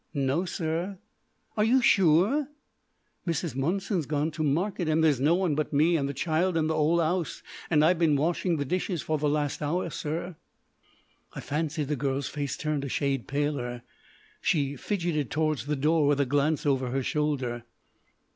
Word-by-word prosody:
"No, 140 +6 +1
sir." 170 +3 -3 0.6
"Are 210 - +2
you 245 +4 +4
sure?" 205 - +4 0.8
"Mrs. 165 -3 -1
Monson's 175 - -1
gone 150 +1 0
to 155 - -5
market, 170 +4 0
and 160 +1 +2
there's 150 -5 +3
no 150 +6 +3
one 180 -4 +1
but 150 +1 -1
me 160 +4 +4
and 140 -3 0
the - - -3
child 165 +5 0
in 160 - +2
the 160 - 0
'ole 160 +2 +2
'ouse, 170 +1 -1 0.3
and 150 -2 +4
I've 175 +1 +3
been 160 -4 +3
washing 165 +3 0
the 145 - -2
dishes 180 +1 -2
for 155 -1 -1
the 150 0 +1
last 145 0 -1
hour, 170 +3 -1
sir." 165 +3 -4 1.0
I - - -6
fancied 150 0 -2
the 150 - 0
girl's 140 0 -2
face 145 -2 -3
turned 150 -2 -2
a 140 - -4
shade 135 -1 -1
paler. 140 -4 -2 0.6
She 145 -3 +1
fidgeted 170 - -2
towards 155 -2 -1
the 150 - 0
door 150 +2 +2
with 145 -1 +2
a 140 - +3
glance 145 +4 +1
over 135 -3 +1
her 135 +2 -1
shoulder. 130 -5 -1
155 Hz, 175 wpm, -27 LUFS, 145-170 Hz, 1.0 s, you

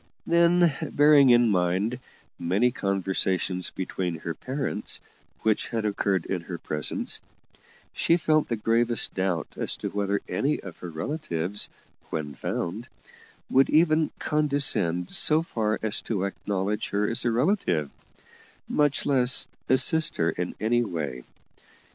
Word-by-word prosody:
Then, 170 -1 +4
bearing 145 -2 +5
in 120 -1 +5
mind 95 +6 0 0.4
many 100 +9 +1
conversations 95 -3 0
between 90 -2 -4
her 85 - -4
parents 135 - -2 0.4
which 110 -1 +1
had 115 -2 -3
occurred 100 -4 0
in 90 -3 -3
her 85 +1 -7
presence, 75 -2 -1 0.7
she 170 - +2
felt 155 -2 +1
the 115 - -1
gravest 115 +2 0
doubt 95 -4 -1
as - - -1
to - - -4
whether 100 0 -1
any 145 +2 -1
of 95 -4 -10
her 90 - -8
relatives, 90 - -2 0.4
when 75 -2 -4
found, 90 - -4 0.6
would 135 +1 +3
even 155 0 +3
condescend 140 - +1
so 155 +1 +4
far 110 -8 -1
as 110 -1 0
to 100 -5 -2
acknowledge 100 +1 -3
her 105 +1 0
as 115 - +1
a 120 - +1
relative, 115 - 0 0.8
much 145 -1 +1
less 130 -2 +4 0.2
assist 155 +5 +4
her 80 -1 +1
in 90 0 -4
any 120 +2 +1
way. 75 - -5
105 Hz, 130 wpm, -26 LUFS, 90-140 Hz, 0.8 s, bearing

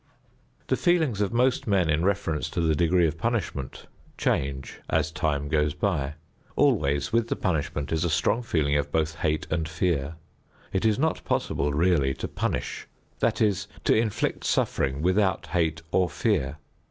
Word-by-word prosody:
The - - +1
feelings 160 - +2
of 100 - +1
most 125 +1 +1
men 95 -5 +3
in 80 +1 +1
reference 95 -6 0
to - - -2
the 80 -1 +2
degree 85 +3 +3
of 80 0 -2
punishment 100 - -3 0.3
change 70 0 -2
as 80 - +1
time 80 -5 -1
goes 75 -1 +1
by. 75 -8 -1 0.4
Always 70 +5 +2
with 115 0 +2
the - - -1
punishment 75 -5 -2
is 80 0 +1
a 85 - +1
strong 95 +9 +1
feeling 80 -11 0
of 70 - -2
both 80 +1 0
hate 80 -3 0
and 80 -1 -1
fear. 80 -2 -1 0.6
It 95 +3 0
is 110 -2 +3
not 160 +3 0
possible 70 +2 0
really 75 -3 +2
to - - -4
punish, - - -3 0.3
that - - +1
is, 100 -2 +1 0.2
to - - +4
inflict 110 -2 0
suffering 70 +2 0
without 95 0 +2
hate 80 -3 -1
or 90 0 +2
fear. 70 -1 0
80 Hz, 165 wpm, -26 LUFS, 75-100 Hz, 0.6 s, to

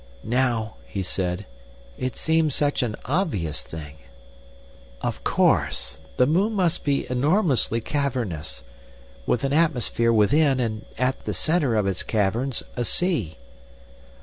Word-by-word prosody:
"Now," 120 -2 0
he 100 -2 -3
said, 90 +2 -2 0.5
"it 130 0 -3
seems 160 -3 +2
such 145 0 +1
an 115 -4 -1
obvious 125 - -1
thing." 80 -1 -9 1.0
"Of - - -3
course! 70 -4 +1 0.2
The 125 - +5
moon 190 - +2
must 180 -4 +1
be 140 -1 +1
enormously 135 - +2
cavernous, 120 - -3 0.6
with 125 - +1
an 135 0 0
atmosphere 130 -7 +2
within, 135 +6 +4
and 110 -3 -2
at 130 +1 -1
the - - -2
centre 155 -8 +1
of 105 -2 +2
its 95 -2 -1
caverns 115 +5 0
a 120 - -1
sea. 120 - 0
125 Hz, 125 wpm, -24 LUFS, 105-150 Hz, 1.0 s, The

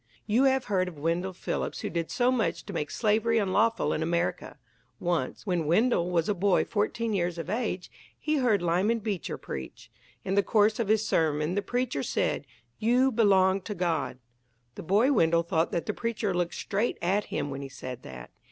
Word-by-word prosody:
You 230 +6 +3
have 265 -1 +2
heard 185 -3 +1
of 175 -4 -8
Wendell 170 +5 -1
Phillips 180 - -3
who - - -3
did 170 -1 -2
so 250 0 +2
much 245 -4 -1
to 200 - -7
make 150 -3 -2
slavery 225 +1 +1
unlawful 225 +3 +2
in 155 - -2
America! 170 +2 -1 0.4
Once, 170 -3 -2
when 175 -6 0
Wendell 180 0 +2
was 170 -2 +1
a 210 - +2
boy 195 0 +2
fourteen 225 +1 -1
years 175 -3 -1
of 170 +2 -4
age, 215 -5 -2 0.3
he 305 0 0
heard 225 -9 +2
Lyman 185 +7 +2
Beecher 205 -5 -3
preach. 65 - -8 0.3
In 190 - -1
the 200 - +4
course 215 +1 +2
of 230 - 0
his 220 +1 +2
sermon 155 0 +1
the 205 - 0
preacher 245 - -1
said, - - -1 0.3
"You 250 +4 +3
belong 195 -4 +4
to 210 +2 -6
God." 170 -7 -1 0.6
The - - -8
boy 210 - +3
Wendell 170 - +3
thought 165 0 0
that 170 - -2
the 215 - -2
preacher 225 -4 -2
looked 175 -1 -1
straight 210 +4 -1
at 195 +4 +1
him 145 - -3
when 135 0 -5
he 135 - -6
said 130 -2 -7
that. 65 - -10
195 Hz, 190 wpm, -28 LUFS, 170-225 Hz, 0.6 s, the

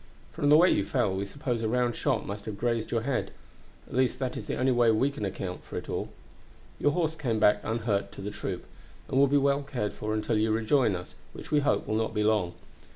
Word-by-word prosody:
From 145 - 0
the 150 - +8
way 175 +3 +6
you - - +2
fell 120 -9 0
we 100 +1 -2
suppose 120 0 -3
a 110 - 0
round 120 0 +1
shot - - 0
must 100 +1 -6
have 105 -2 -5
grazed 115 0 -1
your 115 - 0
head; 135 +1 -1 0.6
at - - -12
least 130 0 +2
that 130 -2 -3
is - - -6
the - - -2
only 130 +1 +2
way 120 -2 +4
we 120 +6 +3
can 140 -7 -4
account 95 -1 -5
for - - -7
it. - - -5 0.9
"Your 145 - +2
horse 165 -3 0
came 125 -8 -1
back 105 -1 +5
unhurt 110 -3 -1
to - - -9
the 105 +1 -4
troop, - - -5 0.4
and 135 - +1
will 140 - +6
be 145 +2 +3
well 140 0 +2
cared 125 -7 -3
for 110 0 -3
until 110 0 0
you 110 +1 +2
rejoin 110 0 +2
us, 90 0 -7 0.2
which - - -10
we 150 - +4
hope 145 - +1
will - - -2
not 110 0 -1
be 105 - +2
long. 105 -5 +1
115 Hz, 240 wpm, -28 LUFS, 105-135 Hz, 0.9 s, the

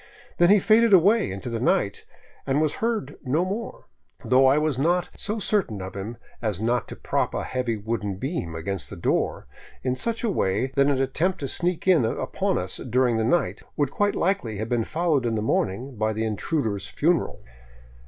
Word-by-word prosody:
Then 175 0 +6
he 205 - +7
faded 220 +2 +4
away 200 +5 +5
into 95 +5 -6
the 115 -1 -2
night 100 -4 0 0.4
and 135 +2 +2
was 155 -1 0
heard 220 - -1
no 150 +6 +1
more, 230 - -5 0.4
though 130 +1 +5
I 135 +2 +5
was 150 -4 0
not 175 +5 +1
so 210 +2 -2
certain 195 - 0
of 95 +1 -7
him 105 +4 -5 0.2
as 105 -5 -2
not 120 +2 0
to - - -7
prop - - -1
a - - -1
heavy 125 -3 -2
wooden 105 -2 -3
beam 95 - -4
against 90 +3 -3
the - - -7
door - - -1 0.4
in 130 -1 0
such 230 - -3
a 230 - +1
way 125 - 0
that 140 0 +4
an 140 -2 +2
attempt 160 +8 0
to 140 - -2
sneak 175 +5 -1
in 175 -8 +5
upon 110 - -1
us - - -3
during 125 -2 +1
the 110 - +1
night 170 +10 +1 0.2
would 145 -3 +1
quite 205 0 +1
likely 180 - 0
have 110 +2 -4
been 120 -3 +1
followed 160 -5 +1
in 115 -2 0
the 105 - -1
morning 115 +5 -1
by 110 +1 0
the 110 +1 -2
intruder's 110 - -2
funeral. 165 - 0
130 Hz, 195 wpm, -25 LUFS, 110-175 Hz, 0.4 s, he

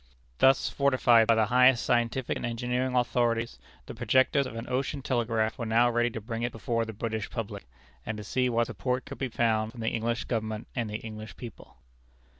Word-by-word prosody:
Thus 135 0 +5
fortified 125 -5 +4
by 115 - +5
the 110 -1 +3
highest 125 +2 +4
scientific 120 +1 0
and - - -6
engineering 125 +2 -1
authorities, 120 -1 0 0.3
the - - -8
projectors 130 +4 +2
of 115 - -9
an 115 +2 -6
ocean 135 +2 -2
telegraph 115 -3 0
were 115 - -2
now 120 +2 +4
ready 120 0 +2
to 115 - -6
bring 115 +1 -5
it 120 +1 -1
before 115 +1 -2
the 110 - -6
British 110 0 -3
public, 100 - -6 0.4
and 110 - -4
to 105 - -7
see 125 +4 0
what 120 0 +2
support 125 +2 -3
could 140 - -9
be 130 - -2
found 110 -1 0
from 120 - -9
the 110 - 0
English 115 +1 -2
Government 110 -2 -3
and 120 -3 -2
the 105 - -3
English 110 -1 -9
people. 120 -2 -11
115 Hz, 200 wpm, -28 LUFS, 110-125 Hz, 0.4 s, Thus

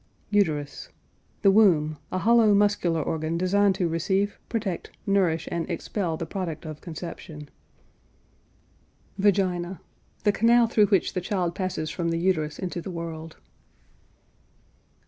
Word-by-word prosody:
UTERUS. 155 -9 0 0.5
The 195 - +7
womb: 160 -8 +4
a - - -1
hollow 220 +1 +5
muscular 200 -6 +2
organ 160 +1 -2
designed 195 +2 +3
to 180 -2 0
receive, 190 +5 0
protect, 215 -6 -3 0.2
nourish, 185 -5 +1
and 170 -1 -2
expel 175 -6 -2
the 165 - -4
product 165 -3 -5
of 155 -1 -7
conception. 160 -3 -8 1.7
VAGINA. 185 -2 +1 0.4
The 210 - +4
canal 235 +3 +4
through 220 -2 +3
which 195 -3 +2
the 180 - -2
child 180 -2 -1
passes 175 -4 -3
from 170 -2 -2
the 165 - 0
uterus 165 -4 0
into 180 -2 -4
the 190 - -7
world. 165 -2 -6
180 Hz, 125 wpm, -26 LUFS, 165-200 Hz, 1.7 s, The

